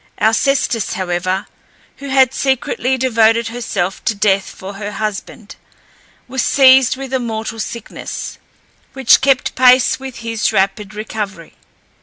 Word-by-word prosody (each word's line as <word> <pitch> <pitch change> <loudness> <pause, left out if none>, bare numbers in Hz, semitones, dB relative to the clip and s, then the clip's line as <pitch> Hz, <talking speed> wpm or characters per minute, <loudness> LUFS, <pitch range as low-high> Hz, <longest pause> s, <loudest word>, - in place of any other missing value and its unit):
Alcestis, 225 0 +1
however, 185 0 -2 0.5
who 280 - -9
had 265 -1 +3
secretly 265 -1 -1
devoted 230 -2 +2
herself 200 -6 -3
to 220 - 0
death 200 -1 +1
for 190 +2 -9
her 205 +1 -6
husband, 215 0 -5 0.7
was 260 0 -2
seized 260 -2 +5
with 270 -1 -7
a 260 - +1
mortal 225 -1 -4
sickness, 230 +1 -6 0.5
which 265 -3 +4
kept 265 -1 +2
pace 255 0 +4
with 265 -2 -8
his 230 -1 -2
rapid 200 +1 -1
recovery. 205 -5 -6
225 Hz, 125 wpm, -17 LUFS, 205-260 Hz, 0.7 s, seized